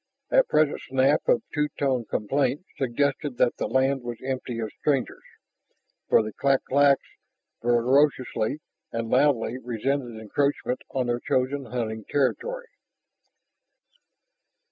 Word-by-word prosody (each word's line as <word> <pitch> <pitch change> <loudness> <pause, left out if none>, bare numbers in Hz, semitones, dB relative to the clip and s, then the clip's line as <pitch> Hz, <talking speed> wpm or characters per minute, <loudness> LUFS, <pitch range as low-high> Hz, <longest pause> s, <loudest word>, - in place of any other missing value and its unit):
That - - +5
present 155 -1 +2
snap 135 +2 +2
of - - +3
two 150 0 +1
tone 130 -4 0
complaint 140 - -1
suggested 135 +1 -1
that 120 - +2
the - - -2
land 135 0 +1
was 120 -1 -5
empty 130 -2 -3
of 110 -2 -3
strangers. 140 -4 0 0.9
For - - +5
the 110 -1 -6
clak 135 +3 +1
claks 140 0 +3 0.6
vociferously 130 +2 +2 0.3
and 115 0 -3
loudly 130 -3 +2
resented 125 0 -2
encroachment 130 +3 -1
on 130 -2 -1
their 120 0 -1
chosen 130 +3 -1
hunting 110 -3 -4
territory. 485 - -1
130 Hz, 120 wpm, -26 LUFS, 120-140 Hz, 0.9 s, That